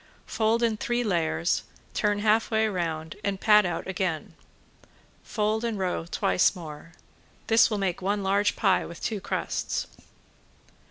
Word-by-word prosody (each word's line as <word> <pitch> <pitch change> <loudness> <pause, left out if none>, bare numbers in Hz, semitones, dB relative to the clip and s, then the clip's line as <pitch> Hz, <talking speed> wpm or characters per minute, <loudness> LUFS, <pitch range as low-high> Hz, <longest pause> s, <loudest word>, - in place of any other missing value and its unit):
Fold 225 +1 +1
in 225 -2 +1
three 240 +2 -1
layers, 160 - 0 0.3
turn 205 0 +1
half 220 +1 +3
way 220 -1 +2
round, 165 -4 -3
and 200 -1 -1
pat 210 -2 +5
out 175 - -3
again. 185 -4 -3 0.9
Fold 215 +1 -1
and 230 -3 -1
roll 180 -3 -2
twice 180 +3 +2
more. 165 -1 -9 0.5
This 225 +2 +5
will 215 - -1
make 195 -3 -1
one 200 +2 0
large 200 +2 +2
pie 195 -3 +2
with 170 - -9
two 215 -3 -3
crusts. - - -2
200 Hz, 145 wpm, -27 LUFS, 175-220 Hz, 0.9 s, pat